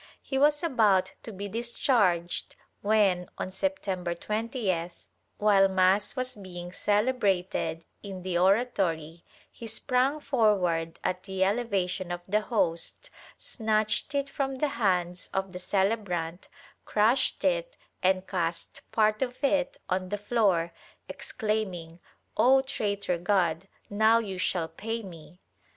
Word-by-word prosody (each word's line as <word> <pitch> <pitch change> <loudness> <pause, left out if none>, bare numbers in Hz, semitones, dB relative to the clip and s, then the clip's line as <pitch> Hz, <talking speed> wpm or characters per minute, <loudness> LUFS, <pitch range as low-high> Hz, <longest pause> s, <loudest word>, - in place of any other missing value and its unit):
He 270 - -2
was 295 +3 +4
about 205 - +3
to 225 - -8
be 200 0 -5
discharged 205 -6 0 0.3
when, 200 -4 +2
on 185 - -4
September 190 -7 -2
20th, 210 -4 -2 0.3
while 200 -2 +5
mass 190 +3 +2
was 255 -1 -2
being 175 -3 -8
celebrated 205 -6 0 0.2
in 190 -3 -7
the 185 -1 -2
oratory, 175 -5 +1 0.3
he 230 - -9
sprang 255 +5 +1
forward 185 - +1
at 185 0 -1
the 190 0 -1
elevation 195 -4 0
of 175 0 -3
the 210 +2 +2
Host, 210 - -1 0.3
snatched 220 +4 -1
it 280 0 +1
from 275 -1 -2
the 290 +3 0
hands 180 -7 0
of 190 -1 -1
the 180 - -5
celebrant, 190 -3 -1 0.4
crushed 220 +5 +2
it - - 0 0.2
and 185 0 +2
cast 170 -3 -3
part 215 0 +2
of 250 +1 -3
it 275 -1 +1
on 185 0 -1
the 205 - -1
floor, 200 -6 +1 0.3
exclaiming 185 -6 -3 0.4
"0 265 +2 +6
traitor 200 -8 -2
God, 175 -1 +1 0.2
now 220 +2 +4
you 195 -5 -3
shall 175 -3 0
pay 225 +6 -5
me!" 170 -2 -12
200 Hz, 125 wpm, -28 LUFS, 180-230 Hz, 0.4 s, 0